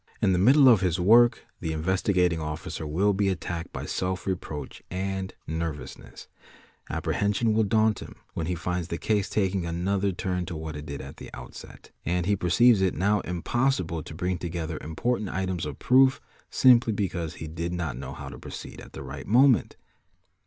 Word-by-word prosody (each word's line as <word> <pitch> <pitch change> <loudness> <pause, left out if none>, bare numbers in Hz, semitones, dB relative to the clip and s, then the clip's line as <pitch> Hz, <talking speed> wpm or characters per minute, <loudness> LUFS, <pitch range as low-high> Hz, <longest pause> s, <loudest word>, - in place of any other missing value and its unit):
In 95 - +3
the 90 - +2
middle 135 +8 +6
of 115 -7 +7
his 90 -1 +1
work 115 +5 +5 0.2
tl 85 - -2
Investigating 90 +1 +1
Officer 75 0 -5
will 95 +7 +2
be 100 0 +1
attacked 85 -1 -4
by - - -5
self 95 0 -2
reproach 80 -7 -5
and 95 +1 -3
nervousness 80 -2 -6 0.6
apprehension 105 +2 0
will 110 - +3
daunt 110 +1 +2
him - - -10 0.2
when 80 - -3
he 90 - -1
finds 90 0 -2
the 85 - -3
case 105 0 0
taking 95 -3 0
another 95 +4 0
tut 90 -1 -3
to 85 - -5
what 80 0 -5
it 75 +1 -7
did 70 -1 -5
at - - -10
the - - -9
outset, 60 - -11
and 90 0 0
he 100 +2 +2
perceives 100 +5 +4
it 95 -1 +1
now 105 +2 +2
impossible 90 -1 -1
to 80 - -9
b 90 +3 -1
'i - - 0
together 85 -2 -4
important 105 +6 -2
items 95 -4 -2
of 75 - -6
proof 130 +1 +4 0.3
simply 120 -3 +5
because 90 -5 -2
he - - -7
did 85 +2 -4
not 85 -7 -3
know 65 +1 -6
how - - -8
proceed - - -9
at - - -13
the - - -7
right - - -8
moment. 125 +3 +4
90 Hz, 180 wpm, -27 LUFS, 85-105 Hz, 0.6 s, of